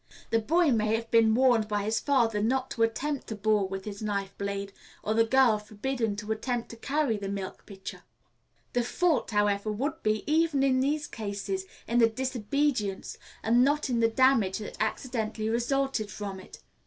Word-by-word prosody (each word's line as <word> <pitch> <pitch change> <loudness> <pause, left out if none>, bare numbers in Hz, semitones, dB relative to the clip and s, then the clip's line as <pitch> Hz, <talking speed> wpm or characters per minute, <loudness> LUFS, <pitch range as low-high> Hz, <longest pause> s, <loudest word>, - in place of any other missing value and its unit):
The 225 - +4
boy 320 +7 +3
may 215 -2 +2
have 230 0 -5
been 225 -1 +5
warned 240 -4 +4
by 205 -1 -1
his 220 +2 0
father 235 -7 +2
not 260 +4 0
to 230 - -4
attempt 265 +5 0
to 220 - -4
bore 210 -1 +2
with 195 0 -6
his 205 -1 -6
knife 200 -2 -2
blade, 200 0 -3 0.3
or 215 - 0
the 225 +1 +4
girl 235 -2 +4
forbidden 220 +1 -2
to 210 +1 -5
attempt 235 +2 -2
to - - -8
carry 275 -1 0
the 200 -1 -5
milk 195 -1 -6
pitcher. 195 -1 -8 0.7
The 245 - +2
fault, 310 +2 +1
however, 205 -1 +1
would 285 +9 -3
be, 215 0 0
even 310 -2 +2
in 260 -1 +3
these 295 +3 0
cases, 220 - -4 0.2
in 240 +1 +2
the 230 -1 +6
disobedience, 250 -3 -1 0.2
and 235 +2 +4
not 290 0 +1
in 235 - +1
the 225 0 +4
damage 230 -6 +3
that 215 - -7
accidentally 220 -1 -2
resulted 240 -1 0
from 200 -2 -6
it. - - -13
225 Hz, 180 wpm, -28 LUFS, 210-265 Hz, 0.7 s, the